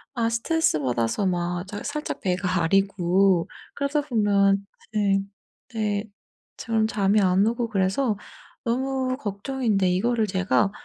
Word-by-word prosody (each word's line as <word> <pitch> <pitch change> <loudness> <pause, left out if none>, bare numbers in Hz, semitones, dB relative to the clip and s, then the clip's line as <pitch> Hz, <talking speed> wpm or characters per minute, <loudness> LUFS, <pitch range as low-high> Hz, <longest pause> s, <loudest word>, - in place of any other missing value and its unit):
아 230 -2 +1
스트레스 230 - +1
받아서 120 - 0
막 175 0 -2
잘 205 +1 -6
살짝 300 +1 -4
배가 185 -2 0
아리고 190 0 +2 0.3
그러다 280 +1 0
보면 200 -6 +2 0.3
네. 200 -2 +2 0.5
네. 210 -2 -1 0.5
저는 220 -1 0
잠이 205 -1 +2
안 185 +1 +3
오고 235 0 -1
그래서 205 +3 +1 0.5
너무 260 +1 -1
걱정인데 210 -2 -1
이거를 225 +5 +1
제가 190 +1 +1
205 Hz, 250 characters per minute, -24 LUFS, 190-230 Hz, 0.5 s, 안